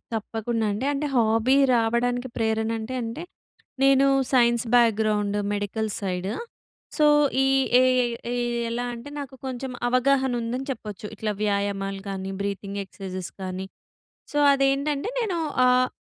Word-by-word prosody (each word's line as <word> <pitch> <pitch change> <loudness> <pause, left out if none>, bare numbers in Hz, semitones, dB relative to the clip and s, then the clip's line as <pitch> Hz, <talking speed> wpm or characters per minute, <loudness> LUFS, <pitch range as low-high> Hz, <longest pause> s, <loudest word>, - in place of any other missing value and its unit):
తప్పకుండా 225 +1 -2
అండి. 210 +6 -3
అంటే 285 +1 -2
హాబీ 225 +2 +3 0.2
రావడానికి 240 +2 +1
ప్రేరణ 220 0 0
అంటే, 220 +4 -5
అంటే 230 +9 -5 0.6
నేను 275 0 +5 0.3
science 240 -2 +4
background 215 -3 +3 0.2
medical 205 +2 -2
side. 185 -1 -2 0.7
So 305 - +3 0.4
ఈ - - +2 0.3
ఏ - - +5 0.5
ఏ - - -1 0.4
ఎలా 240 +1 -2
అంటే 235 +4 -9
నాకు 275 -2 -7
కొంచెం 260 0 -4 0.2
అవగాహన 260 +1 +2
ఉందని 245 +3 -3
చెప్పొచ్చు. 210 -5 -6
ఇట్లా 215 0 -2
వ్యాయామాలు 200 -1 -1
గానీ, 190 -1 -4
బ్రీతింగ్ 200 0 -3
ఎక్సర్సైజెస్ 185 -2 -7
గానీ, 185 0 -4 0.7
సో 295 - 0
అది 275 0 +2
ఏంటంటే 285 +5 -1
నేను 390 -7 -1 0.3
ఆహ్, 250 0 +4
230 Hz, 130 wpm, -25 LUFS, 205-255 Hz, 0.7 s, నేను